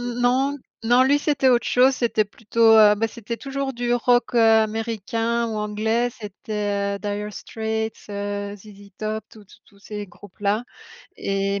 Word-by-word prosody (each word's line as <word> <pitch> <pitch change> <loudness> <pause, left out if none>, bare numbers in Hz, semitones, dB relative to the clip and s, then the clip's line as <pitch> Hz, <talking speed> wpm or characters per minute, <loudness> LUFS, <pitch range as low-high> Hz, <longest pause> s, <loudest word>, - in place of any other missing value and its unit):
non, 245 +3 0 0.3
non, 245 +3 +5
lui, 280 +2 +4
c'était 285 -3 +2
autre 245 -2 +3
chose, 260 +2 +4
c'était 230 -4 +1
plutôt, 225 +1 +3
heu, 210 -1 +7
bah, 225 +2 -1
c'était 230 +1 -6
toujours 275 -1 -3
du 240 -1 0
rock, 245 0 +2
heu, - - +4
Américain 225 +1 +1
ou 220 - -4
Anglais. 220 +3 0
C'était 205 -2 -3
heu, - - -9
Dire 205 +1 -4
Straits, 220 +1 -3 0.2
heu, 205 0 -4
ZZ 205 0 -14
Top, 215 0 -3
tous 215 -2 -15
tous 190 - -20
tous 200 - -23
ces 210 0 -7
groupes-là. 205 +3 -3 0.5
Et, 195 0 -1
220 Hz, 160 wpm, -23 LUFS, 205-240 Hz, 0.5 s, heu